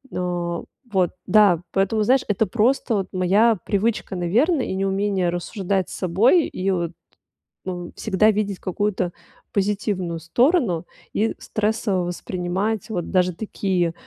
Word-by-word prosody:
О, 175 -1 -2 0.3
вот, 185 -3 +2 0.2
да, 200 -6 +5
поэтому, 200 +3 +1
знаешь, 255 +4 +3
это 210 +1 +1
просто 240 +1 +1
вот 195 -2 -1
моя 200 +5 +3
привычка, 210 -1 0
наверно, 240 - +2
и - - -3
неумение 195 -1 0
рассуждать 190 +2 -2
с - - -8
собой 215 - +3
и 195 +1 -2
вот, 170 -2 -1 0.7
ну, 175 -2 -5
всегда 215 +1 +3
видеть 205 -2 -1
какую-то 185 -1 -1 0.4
позитивную 195 -4 -1
сторону. 205 - +2 0.3
И 220 +2 0
стрессово 210 -4 -1
воспринимать 185 +5 -2
вот 180 -6 -3
даже 180 -1 +2
такие 185 -5 -1
195 Hz, 130 wpm, -22 LUFS, 180-215 Hz, 0.7 s, да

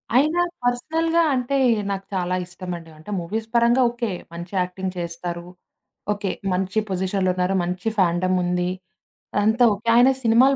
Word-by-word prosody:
అయినా 310 +7 +4 0.2
పర్సనల్‌గా 320 +7 +1
అంటే 255 +2 0 0.3
నాకు 195 0 -4
చాలా 180 0 0
ఇష్టమండి. 175 -2 -7
అంటే 160 +7 -10
మూవీస్ 220 +6 -4
పరంగా 235 +2 +4
ఓకే. 235 -3 -3 0.2
మంచి 175 +3 -8
యాక్టింగ్ 180 +1 -2
చేస్తారు. 170 0 -5 0.7
ఓకే. 205 -2 -3 0.2
మంచి 190 +3 0
పొజిషన్‌లో 190 0 0
ఉన్నారు. 185 +1 +1
మంచి 180 +4 -2
ఫాండమ్ 185 +1 +2
ఉంది. 180 0 0 0.7
అంతా 220 +3 +3
ఓకె. 210 +4 -9
ఆయన 245 +2 +7
సినిమాలు 250 +4 +5
190 Hz, 135 wpm, -23 LUFS, 180-235 Hz, 0.7 s, ఆయన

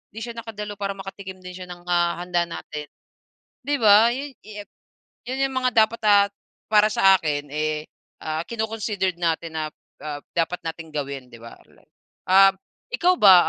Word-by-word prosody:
'di 225 - -5
siya 235 - -5
nakadalo. 210 -2 -7
Para 200 0 -2
makatikim 190 -1 -9
din 180 - -7
siya 180 0 -9
ng, 175 0 -10
ah, 175 -1 +1
handa 175 -1 0
natin," 150 -3 -7 0.8
'di 290 0 +1
ba. 215 +2 +7
'Yon 280 +1 -5
'yo 210 -1 -8 0.6
yon 260 +1 -3
'yong 265 - -8
mga 255 -1 +1
dapat 230 +1 -10
at 200 -1 +5 0.4
para 210 0 +6
sa 195 -2 +6
akin, 145 -2 -2
eh, 155 0 -2 0.4
ah, 155 0 -2
kino-considered 215 -5 -2
natin 165 -1 -1
na, 155 - -2 0.4
ah, 145 -1 -4 0.2
dapat 170 +1 0
nating 160 0 -6
gawin, 140 -3 -4
'di 120 - -13
ba. 115 - -11 0.7
Ah, 195 +1 +7 0.4
ikaw 365 -6 +3
ba, 190 -3 +9
190 Hz, 165 wpm, -23 LUFS, 165-210 Hz, 0.8 s, ba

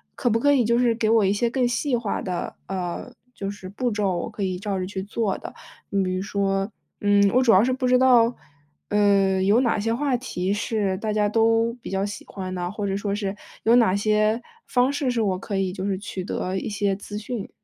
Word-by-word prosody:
可 245 - 0
不 230 0 +2
可 285 +4 +4
以 265 -3 +4
就 235 +2 +2
是 240 -2 +3
给 220 -1 0
我 225 -3 +4
一 195 - +2
些 235 +3 +1
更 250 0 +1
细 245 +1 0
化 225 -4 -2
的， 180 -2 -4
呃， 185 +5 -4 0.2
就 195 0 -4
是 200 -2 -9
步 240 +6 -2
骤， 205 -3 0
我 - - -3
可 210 -1 -8
以 185 -2 -1
照 200 0 -3
着 185 - -2
去 190 0 -5
做 210 0 -1
的？ - - -8 0.4
你 200 - +1
比 185 -1 -1
如 185 - -2
说， 195 0 -1 0.3
嗯， 205 0 +4
我 255 - +4
主 235 - +5
要 190 0 +7
是 255 +2 +2
不 255 0 -2
知 250 - +5
道， 245 -2 +5 0.5
呃， 200 -2 +3
有 205 +5 +4
哪 240 -4 +2
些 225 +2 0
话 270 +1 0
题 195 -6 -2
是 205 -2 -1
大 215 -1 -2
家 210 -1 +2
都 225 +2 +2
比 - - -7
较 195 +1 0
喜 205 0 -7
欢 185 -2 -6
的， 175 0 -3
或 205 -1 -3
者 195 - -1
说 200 0 -2
是， 200 -1 -2 0.3
有 230 +2 +5
哪 230 -6 +5
些 215 +2 +2 0.2
方 250 +1 +2
式 280 -3 0
是 235 -2 0
我 190 -3 +1
可 195 +1 -4
以 190 -1 -1
就 190 0 -4
是 195 -2 0
取 195 -2 -6
得 185 0 -3
一 - - -3
些 200 -1 0
资 205 +1 -7
讯。 215 0 -5
205 Hz, 255 characters per minute, -24 LUFS, 195-230 Hz, 0.5 s, 要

